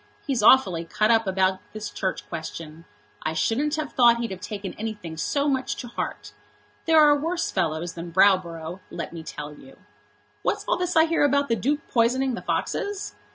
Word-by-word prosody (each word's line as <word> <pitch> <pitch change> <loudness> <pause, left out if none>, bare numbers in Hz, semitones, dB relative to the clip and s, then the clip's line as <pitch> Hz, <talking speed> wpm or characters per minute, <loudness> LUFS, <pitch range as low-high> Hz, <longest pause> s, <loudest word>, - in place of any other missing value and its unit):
He's 265 -6 0
awfully 200 -8 +5
cut 215 +6 +1
up 225 -2 +3
about 190 0 +1
this 215 0 -6
Church 190 -1 -3
Question. 165 -1 -7 0.4
I 155 - -2
shouldn't 285 - 0
have 310 -2 -4
thought 240 -2 +6
he'd 235 -2 -3
have 185 -1 -7
taken 205 -2 -5
anything 210 -7 -6
so 280 - 0
much 265 -2 0
to 245 - -7
heart. - - -5 0.5
There 320 -1 +5
are 295 -1 +7
worse 335 +4 -2
fellows 165 +1 -1
than 170 0 -7
Browborough, 175 -2 +2
let - - -6
me 165 - -6
tell 150 -1 -7
you. 270 - -15 0.6
What's - - -1
all - - +2
this 360 -1 -2
I 320 0 +6
hear 330 -2 +1
about 280 0 +2
the 230 - +3
Duke 285 - -1
poisoning 255 +3 +2
the 235 - -4
foxes?" 405 -1 -2
225 Hz, 185 wpm, -25 LUFS, 175-280 Hz, 0.6 s, are